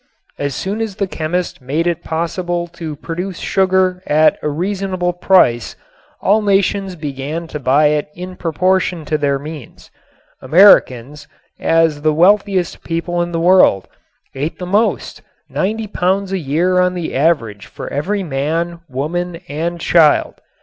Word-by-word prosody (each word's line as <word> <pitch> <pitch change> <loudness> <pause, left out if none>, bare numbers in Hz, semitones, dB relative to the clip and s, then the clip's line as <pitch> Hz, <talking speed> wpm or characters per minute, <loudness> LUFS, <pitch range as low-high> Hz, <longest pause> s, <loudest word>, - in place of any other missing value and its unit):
As 140 -2 -2
soon 205 +4 -3
as 220 -4 -3
the 200 - -1
chemist 175 -2 -3
made 145 +6 -1
it 170 -1 -1
possible 175 +1 -2
to 160 -3 -7
produce 175 +4 -5
sugar 185 -1 +1
at 155 +1 +3
a - - -1
reasonable 185 +2 -2
price 175 -10 +2 0.5
all 210 +3 +3
nations 195 -1 +1
began 150 +1 -5
to 150 - -5
buy 145 +3 +3
it 150 0 -1
in 185 +1 -8
proportion 180 0 0
to 155 - 0
their 140 -1 +1
means. 150 -3 -10 0.5
Americans, 145 - +4 0.3
as 165 -3 +2
the 155 0 +1
wealthiest 190 +1 +2
people 170 +1 -2
in 175 0 -2
the 165 - -2
world, 175 - +4 0.5
ate 145 +4 -4
the 180 - -6
most, 205 +5 0 0.3
ninety 220 +3 -2
pounds 195 -1 -1
a 195 - -1
year 170 +5 +1
on 180 0 +2
the 175 -3 -4
average 115 - 0
for - - -9
every 195 +8 -1
man, 165 +3 -2
woman 165 +6 -3
and 170 +4 -3
child. 160 -2 +3
170 Hz, 145 wpm, -17 LUFS, 150-185 Hz, 0.5 s, Americans